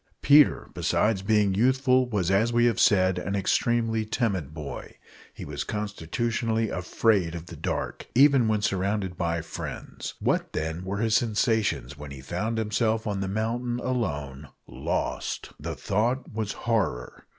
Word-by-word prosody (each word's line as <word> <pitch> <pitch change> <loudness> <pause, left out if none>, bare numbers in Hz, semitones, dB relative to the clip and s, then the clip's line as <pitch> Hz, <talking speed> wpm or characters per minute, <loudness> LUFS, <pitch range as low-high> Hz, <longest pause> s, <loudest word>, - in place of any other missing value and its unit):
Peter, 145 0 +5
besides 105 -3 +1
being 105 -1 +2
youthful, 130 +3 +3
was, 95 -6 0
as 110 +5 +3
we 120 0 +3
have 115 -3 +2
said, 95 -2 +4
an 100 +2 -3
extremely 115 +3 +1
timid 105 - -1
boy. 75 -3 -7 0.4
He - - -9
was - - -4
constitutionally 110 +3 -2
afraid 90 -1 +1
of 85 -1 -7
the - - -10
dark, - - -4
even 135 -2 +6
when 105 -1 +1
surrounded 95 -1 -1
by 85 -2 -1
friends. - - -7
What, - - 0
then, 80 +3 -3
were 95 +2 -3
his 110 0 +1
sensations 110 - 0
when 75 0 -8
he 70 -1 -9
found 105 - -3
himself 110 +1 0
on 100 -3 -2
the 95 - -2
mountain 120 +4 -2
alone 75 - -3 0.2
lost! - - -3
The - - -5
thought 120 +6 -1
was 110 -1 -2
horror! 105 - -2
105 Hz, 150 wpm, -26 LUFS, 90-115 Hz, 0.4 s, even